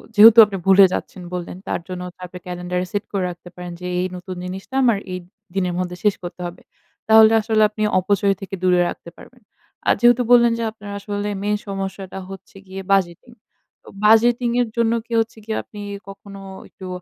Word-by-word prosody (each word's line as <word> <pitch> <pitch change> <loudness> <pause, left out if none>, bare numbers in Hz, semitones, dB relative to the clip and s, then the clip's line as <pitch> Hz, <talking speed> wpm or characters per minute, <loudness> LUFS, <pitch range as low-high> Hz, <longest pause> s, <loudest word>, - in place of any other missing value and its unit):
যেহেতু 220 +2 +9
আপনি 200 -2 -5
ভুলে 195 0 +8
যাচ্ছেন 185 - -5
বললেন, 180 0 -5
তার - - -2
জন্য 180 -1 -6 0.2
তারপরে 180 0 -9
ক্যালেন্ডার 180 0 -3
সেট 205 0 -2
করে 195 -2 -1
রাখতে 175 0 -10
পারেন 180 0 -7
যে, 180 - -8
"এ, - - -1
এই 185 - 0
নতুন 185 +1 -8
জিনিসটা, 190 +7 -7
আমার 235 -4 +4 0.2
এই 180 - -3 0.4
দিনের 180 -2 0
মধ্যে 180 -1 -3
শেষ 210 -2 +3
করতে 175 0 -7
হবে।" 175 +1 -11 0.5
তাহলে 220 0 +7
আসলে 215 0 +1
আপনি 215 0 -8 0.2
অপচয় 200 +1 +1
থেকে 195 0 -6
দূরে 180 -1 +4
রাখতে - - -9
পারবেন। 250 -1 -16 0.5
আর - - +6
যেহেতু 240 +1 +5
বললেন 235 -1 +6
যে, - - -1
আপনার 205 -2 -10
আসলে 205 0 -4
মেইন 210 0 +1
সমস্যাটা 195 -1 -5
হচ্ছে 195 0 -11
গিয়ে 190 +1 -7
বাজেটিং। 195 +4 0 0.5
তো - - -23 0.2
বাজেটিং 235 +2 +4
এর 245 - 0
জন্য 230 0 +2
কি, 235 - -8
হচ্ছে 225 0 -2
কি? 220 - -6
আপনি 210 -1 -11 0.3
কখনো 195 0 -11 0.3
একটু 185 - -11
195 Hz, 190 wpm, -21 LUFS, 180-220 Hz, 0.5 s, যেহেতু